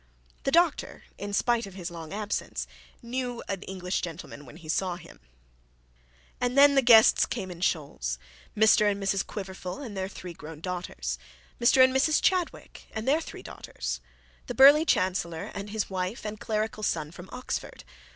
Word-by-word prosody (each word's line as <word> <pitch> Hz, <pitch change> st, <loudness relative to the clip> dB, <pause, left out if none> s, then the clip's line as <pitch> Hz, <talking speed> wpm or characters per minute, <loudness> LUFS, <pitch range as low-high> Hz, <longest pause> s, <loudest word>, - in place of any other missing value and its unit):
The 275 Hz, -, +2 dB
doctor, 335 Hz, -1 st, +2 dB, 0.2 s
in 205 Hz, 0 st, -4 dB
spite 235 Hz, +2 st, +1 dB
of 190 Hz, -, -12 dB
his 175 Hz, -3 st, -5 dB
long 165 Hz, -2 st, -8 dB
absence, 210 Hz, +1 st, -3 dB, 0.4 s
knew 245 Hz, 0 st, -3 dB
an 195 Hz, -2 st, -3 dB
English 185 Hz, -1 st, -3 dB
gentleman 160 Hz, -4 st, -7 dB
when 145 Hz, -, -12 dB
he 165 Hz, -2 st, -13 dB
saw 180 Hz, +3 st, 0 dB
him. 170 Hz, -1 st, -13 dB, 1.2 s
And 250 Hz, +2 st, 0 dB
then 285 Hz, 0 st, +8 dB
the 270 Hz, -, +5 dB
guests 235 Hz, -3 st, +7 dB
came 190 Hz, -6 st, -4 dB
in 175 Hz, -1 st, -9 dB
shoals; 140 Hz, -, -1 dB, 0.4 s
Mr 215 Hz, -1 st, +6 dB
and 200 Hz, -1 st, -1 dB
Mrs 195 Hz, 0 st, +1 dB
Quiverful 190 Hz, -2 st, -6 dB
and 240 Hz, -8 st, -7 dB
their 190 Hz, 0 st, -2 dB
three 180 Hz, -3 st, -8 dB
grown 155 Hz, -1 st, -10 dB
daughters. 180 Hz, +1 st, -4 dB, 0.4 s
Mr 260 Hz, +2 st, +6 dB
and 260 Hz, 0 st, +4 dB
Mrs 300 Hz, +3 st, +4 dB
Chadwick 365 Hz, -2 st, -1 dB
and 220 Hz, +2 st, -4 dB
their 300 Hz, +4 st, +3 dB
three -, -, -9 dB
daughters. -, -, -5 dB, 0.5 s
The -, -, -4 dB
burly 290 Hz, +4 st, +8 dB
chancellor 180 Hz, -, 0 dB
and 200 Hz, +1 st, -6 dB
his 215 Hz, 0 st, -2 dB
wife 185 Hz, +4 st, -3 dB
and 210 Hz, 0 st, -5 dB
clerical 215 Hz, 0 st, -2 dB
son 155 Hz, -7 st, -1 dB
from 180 Hz, +2 st, -11 dB
Oxford. 250 Hz, -, -5 dB
200 Hz, 170 wpm, -28 LUFS, 175-240 Hz, 1.2 s, then